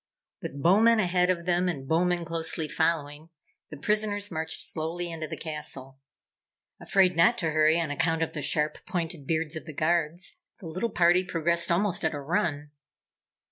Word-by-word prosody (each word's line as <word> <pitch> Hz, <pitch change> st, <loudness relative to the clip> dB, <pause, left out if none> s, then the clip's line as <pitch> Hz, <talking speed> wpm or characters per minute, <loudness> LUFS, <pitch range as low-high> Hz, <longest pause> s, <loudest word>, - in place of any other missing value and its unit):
With 140 Hz, -, -6 dB
Bowmen 220 Hz, +6 st, +5 dB
ahead 180 Hz, -2 st, +2 dB
of 170 Hz, -2 st, 0 dB
them 180 Hz, 0 st, +1 dB
and 135 Hz, -6 st, -5 dB
Bowmen 175 Hz, +2 st, +1 dB
closely 165 Hz, -1 st, -2 dB
following, 155 Hz, -1 st, -1 dB, 0.4 s
the 150 Hz, -, -8 dB
prisoners 205 Hz, +3 st, 0 dB
marched 160 Hz, 0 st, -4 dB
slowly 170 Hz, +2 st, -4 dB
into 160 Hz, -1 st, -5 dB
the -, -, -6 dB
castle. 140 Hz, -4 st, -4 dB, 0.8 s
Afraid 185 Hz, -2 st, +3 dB
not 230 Hz, +9 st, +4 dB
to 165 Hz, -6 st, -1 dB
hurry 155 Hz, +2 st, +4 dB
on 165 Hz, -3 st, -2 dB
account 165 Hz, +2 st, +1 dB
of 160 Hz, -, -4 dB
the 150 Hz, -, -4 dB
sharp 150 Hz, +2 st, -1 dB
pointed 165 Hz, -5 st, -4 dB
beards 160 Hz, -1 st, -1 dB
of 160 Hz, -, -6 dB
the 155 Hz, -, -7 dB
Guards, 170 Hz, +2 st, 0 dB, 0.2 s
the -, -, -11 dB
little 185 Hz, +8 st, -2 dB
party 175 Hz, -1 st, +4 dB
progressed 170 Hz, -1 st, +1 dB
almost 180 Hz, +1 st, +1 dB
at 160 Hz, -1 st, 0 dB
a -, -, -4 dB
run. 145 Hz, -1 st, -1 dB
165 Hz, 170 wpm, -27 LUFS, 155-180 Hz, 0.8 s, Bowmen